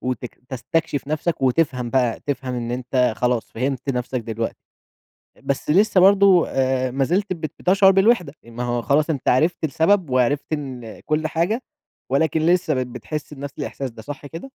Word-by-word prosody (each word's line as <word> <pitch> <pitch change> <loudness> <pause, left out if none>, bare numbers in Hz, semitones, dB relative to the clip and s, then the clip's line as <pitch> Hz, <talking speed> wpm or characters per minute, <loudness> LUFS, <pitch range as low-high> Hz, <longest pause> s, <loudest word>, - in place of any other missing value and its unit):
وتك 125 -1 -4
تستكشِف 145 +3 -2
نفْسك 155 +1 -1
وتفهَم 125 -3 +1
بقى، 125 -4 +1
تفهَم 135 -3 -2
إن 120 -1 -3
أنت 125 -1 0
خلاص 125 -2 0
فهمت 130 +3 -3
نفْسك 125 0 -2
دلوقتي، 115 0 -4 0.9
بس 140 +2 -2
لسه 195 +2 +4
برضه 195 -2 +6
آآ 130 -1 0
ما 135 +2 0
زلت 190 +6 0
بت 160 -3 -5
بتشعُر 195 +1 +5
بالوحدة، 195 -5 +3
ما 115 +1 -7
هو 120 -1 -1
خلاص 150 +5 +2
أنت 140 -5 -2
عرِفت 160 +6 +2
السبب 160 +3 +2
وعرِفت 130 +4 +1
إن 130 -6 -5
كلّ 155 +1 -1
حاجة، 175 +10 -1 0.5
ولكن 155 +3 +1
لسه 175 -4 +2
بت 130 -1 -1
بتحس 145 +5 -6
بنفْس 140 0 -7
الإحساس 135 -2 -4
ده، 110 -1 -12
صح 145 +3 -8
كده؟ 165 +4 -8
140 Hz, 165 wpm, -22 LUFS, 125-165 Hz, 0.9 s, برضه